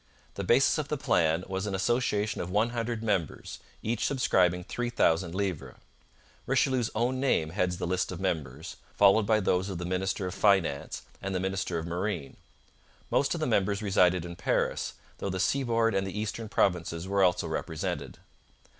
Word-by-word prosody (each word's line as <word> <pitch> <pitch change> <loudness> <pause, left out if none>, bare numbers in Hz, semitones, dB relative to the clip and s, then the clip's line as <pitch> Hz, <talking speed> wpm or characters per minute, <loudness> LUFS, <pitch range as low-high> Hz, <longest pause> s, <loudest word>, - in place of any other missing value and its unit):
The - - -4
basis - - +4
of - - -2
the - - -2
plan 80 +1 +2
was 95 +2 -3
an 100 - -2
association 105 0 0
of 85 - -4
one 105 +5 +1
hundred 115 -1 -3
members, 95 -8 -2 0.2
each 115 0 -1
subscribing 90 -9 +2
three 120 +6 -3
thousand 85 -7 +1
livres. 90 -10 -3 0.7
Richelieu's 130 -2 +2
own 125 +3 0
name 105 - +1
heads 90 -1 0
the - - -3
list 90 +1 -1
of 90 - -6
members, 80 -1 -3 0.2
followed 100 +1 +5
by 110 -1 +4
those 95 -1 +1
of 95 - -4
the 90 - -4
minister 95 +1 -1
of 90 - -3
finance 95 -9 +1 0.2
and 100 0 -3
the - - +1
minister 95 -2 -2
of 80 - -3
marine. 85 -3 -3 0.7
Most - - +2
of - - -4
the - - +1
members 100 +2 +1
resided 90 -3 +3
in 85 0 -7
Paris, - - -1 0.3
though 100 - -2
the 95 0 -3
seaboard 115 +1 +2
and 95 0 0
the 100 +2 -4
eastern 110 +1 -4
provinces 90 -4 0
were 100 0 +1
also 90 -2 +3
represented. 80 0 -4
95 Hz, 175 wpm, -29 LUFS, 90-110 Hz, 0.7 s, followed